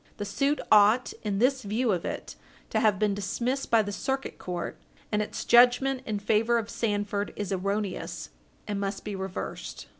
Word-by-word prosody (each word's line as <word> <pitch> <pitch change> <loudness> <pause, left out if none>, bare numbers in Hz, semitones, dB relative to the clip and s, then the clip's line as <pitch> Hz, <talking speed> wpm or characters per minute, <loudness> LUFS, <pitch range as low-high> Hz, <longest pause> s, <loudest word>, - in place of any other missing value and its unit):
The 205 - -3
suit 275 +8 0
ought, 215 +4 +5
in 205 -2 -2
this 260 +4 +2
view 220 +2 0
of 180 -3 -1
it, - - -5 0.4
to - - +2
have 210 -3 +3
been 210 0 +1
dismissed 240 +7 -2
by 230 -2 +5
the 205 - -4
Circuit 270 +6 -3
Court, 175 -1 -5 0.3
and 210 0 +2
its 210 - -4
judgment 250 +2 +5
in 215 -2 -1
favor 220 +3 +2
of 225 -1 -3
Sandford 205 -2 -1
is 205 -2 -4
erroneous, 200 +1 -2 0.4
and 205 -2 -2
must 195 0 -3
be 210 -1 -3
reversed. 190 -1 -5
210 Hz, 175 wpm, -28 LUFS, 200-240 Hz, 0.4 s, ought